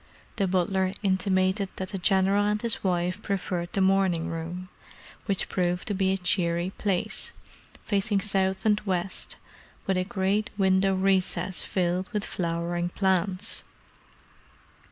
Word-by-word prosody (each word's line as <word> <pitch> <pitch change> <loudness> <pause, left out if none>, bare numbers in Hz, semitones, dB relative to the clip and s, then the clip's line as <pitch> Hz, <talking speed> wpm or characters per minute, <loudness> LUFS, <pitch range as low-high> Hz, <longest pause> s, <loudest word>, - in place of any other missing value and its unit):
The 200 -3 +2
butler 185 +1 +1
intimated 190 0 +2
that 190 -1 -4
the 195 - -4
General 195 +2 +3
and 210 0 +1
his 230 0 -2
wife 180 +1 0
preferred 180 -4 -2
the 195 - +1
morning 190 -3 +2
room, 170 +2 -5 0.6
which 195 -2 +1
proved 180 -1 -1
to - - +1
be 190 -1 +2
a 190 - +1
cheery 175 -1 +1
place, 195 -4 -1 0.5
facing 200 0 +1
south 190 -1 +1
and 210 -1 +3
west, 185 -2 -1 0.5
with 190 -1 +1
a 185 - +2
great 195 +2 0
window 190 0 +3
recess 185 -1 +1
filled 180 0 -1
with 210 -1 0
flowering 175 0 -2
plants. 190 +2 0
190 Hz, 135 wpm, -27 LUFS, 180-195 Hz, 0.6 s, General